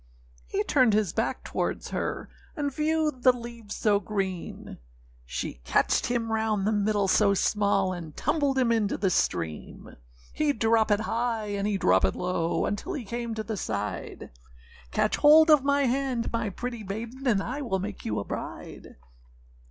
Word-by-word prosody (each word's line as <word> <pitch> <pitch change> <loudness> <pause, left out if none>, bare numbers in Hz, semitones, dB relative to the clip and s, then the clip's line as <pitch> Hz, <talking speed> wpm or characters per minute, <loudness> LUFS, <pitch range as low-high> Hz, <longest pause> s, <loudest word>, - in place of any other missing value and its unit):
â - - -27
He - - +1
turned 255 -3 +3
his 205 -5 +1
back - - -1
towards - - -3
her, - - -3 0.3
And 285 -4 -2
viewed 305 -2 0
the 255 - +7
leaves 235 -3 -8
so 205 -2 +2
green; 195 -4 -4 0.5
She - - -5
catched 65 - +2
him 235 -2 -1
round 220 -3 0
the 215 - +2
middle 205 -1 +1
so 200 +1 +4
small, 200 -2 +1
And 165 -4 -8
tumbled 290 -3 +1
him 250 -3 +3
into 220 -3 +1
the 190 -3 +1
stream. 80 - -2 0.4
He 295 -2 +1
droppèd 225 -2 +2
high, 225 -1 -1
and 200 0 -1
he 205 -2 0
droppèd 95 - +3
low, 180 -2 -1
Until 210 - -3
he 275 -8 -5
came 235 +1 -4
to 220 - -3
the 220 -1 -4
side,â - - -4 0.6
âCatch - - +1
hold 310 +2 +7
of 295 -3 +6
my 280 0 +2
hand, 255 -2 -1
my 230 -2 -1
pretty 235 +3 -5
maiden, 230 +7 -6
And 205 -5 +2
I 265 +5 -4
will 230 -8 -1
make 195 +2 -6
you 105 - -2
my 100 - -2
bride. - - -7
220 Hz, 165 wpm, -27 LUFS, 200-250 Hz, 0.6 s, the